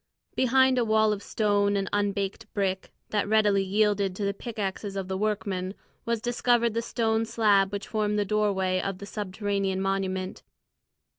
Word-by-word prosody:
Behind 260 0 +4
a - - +3
wall 220 -1 +3
of 200 - -5
stone 205 -1 +1
and 195 -1 -1
unbaked 205 +1 -1
brick, 190 -2 -1 0.2
that 205 -1 0
readily 210 -2 +4
yielded 200 -1 +1
to 200 - -2
the 200 - 0
pickaxes 200 -2 -4
of 195 -1 -3
the 190 - -3
workmen, 195 -2 -2 0.3
was 235 -1 0
discovered 240 0 +1
the 230 - 0
stone 225 -1 0
slab 205 -4 +3
which 200 0 -5
formed 210 -1 0
the 205 - +1
doorway 190 -3 +1
of 195 -1 -3
the 200 - -8
subterranean 200 -1 -2
monument. 190 -1 -2
205 Hz, 160 wpm, -27 LUFS, 195-220 Hz, 0.3 s, Behind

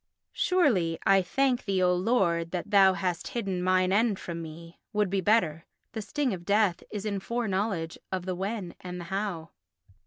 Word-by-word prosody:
Surely, 220 - +2
"I 195 0 +5
thank 255 +6 0
thee, 190 -2 +1
O 180 0 +4
Lord, 180 -4 +1
that 180 +4 -4
thou 195 -2 +6
hast 180 -3 -2
hidden 195 -5 -2
mine 185 0 +2
end 215 -1 +2
from 170 -2 -6
me" 165 +1 -10
would 210 -3 +1
be 195 -1 +1
better. 170 -6 +2 0.3
The 220 - -4
sting 245 +4 -1
of 175 -2 -6
death 200 -1 +2
is 210 -1 -5
in 200 -2 -1
foreknowledge 195 -6 -2
of 185 -2 -2
the 185 - -2
when 190 0 -4
and 180 0 -6
the - - -6
how. 190 -6 -3
190 Hz, 180 wpm, -28 LUFS, 175-210 Hz, 0.3 s, thou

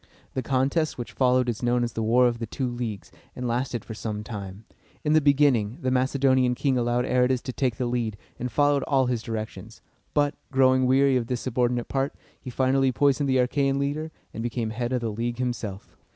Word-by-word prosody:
The 130 - -1
contest 135 +5 0
which 120 - -6
followed 125 -1 +2
is 115 -1 -2
known 120 0 +2
as 120 - -3
the 115 - -3
War 120 +3 +4
of 120 -1 -2
the 115 - -4
Two 130 +4 -3
Leagues, 120 -5 -5 0.2
and 125 - -3
lasted 120 -1 -2
for 110 - -7
some 105 -1 -4
time. 100 -1 -7 0.4
In 150 - +2
the 155 - +5
beginning, 140 -6 +3
the 130 - +1
Macedonian 130 -1 +2
king 135 +1 +1
allowed 120 0 +1
Aratus 125 0 +2
to 130 - -5
take 125 -4 0
the 125 - -2
lead, 120 -3 -2 0.2
and 125 0 -3
followed 145 +3 +3
all 135 -2 +3
his 125 -2 -1
directions; 110 -1 -6 0.4
but, 145 0 +2 0.2
growing 130 -1 +4
weary 135 +1 +4
of 120 -2 -2
this 125 -2 -2
subordinate 120 -1 0
part, 135 +1 -1 0.2
he 130 - -8
finally 130 +1 +2
poisoned 140 +2 +2
the 130 - +3
Achæan 135 +2 +1
leader, 145 +3 -2 0.2
and 115 - -5
became 115 -1 -2
head 120 +2 -3
of 125 -1 0
the 115 -2 -2
league 120 +3 -3
himself. 120 -6 -4
125 Hz, 205 wpm, -26 LUFS, 120-135 Hz, 0.4 s, the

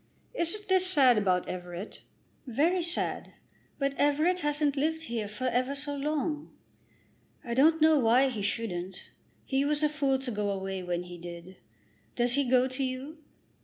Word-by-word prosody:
Isn't 415 0 -3
this 375 -1 +3
sad 265 -10 +5
about 185 -3 +1
Everett?" 180 +2 -7 0.5
"Very 320 +9 +1
sad. 340 +1 -1 0.4
But 275 -1 0
Everett 305 +6 +2
hasn't 295 -2 +1
lived 320 +3 -1
here 230 -7 -3
for 210 +5 -8
ever 255 +2 0
so 285 0 -2
long." 300 +1 -2 0.9
"I 235 -4 -4
don't 315 +6 +4
know 315 -1 +5
why 250 +3 +4
he 225 -5 -5
shouldn't. 190 -3 -4 0.3
He 270 0 0
was 295 +1 0
a 300 - +4
fool 280 -3 +1
to 260 -1 -5
go 210 -2 -2
away 195 -1 -3
when 175 -1 -3
he 175 -1 -10
did. 175 +2 -10 0.6
Does 240 0 +2
he 280 -2 +1
go 255 0 +4
to 260 +1 -3
you?" 265 +4 -5
265 Hz, 165 wpm, -29 LUFS, 210-300 Hz, 0.9 s, sad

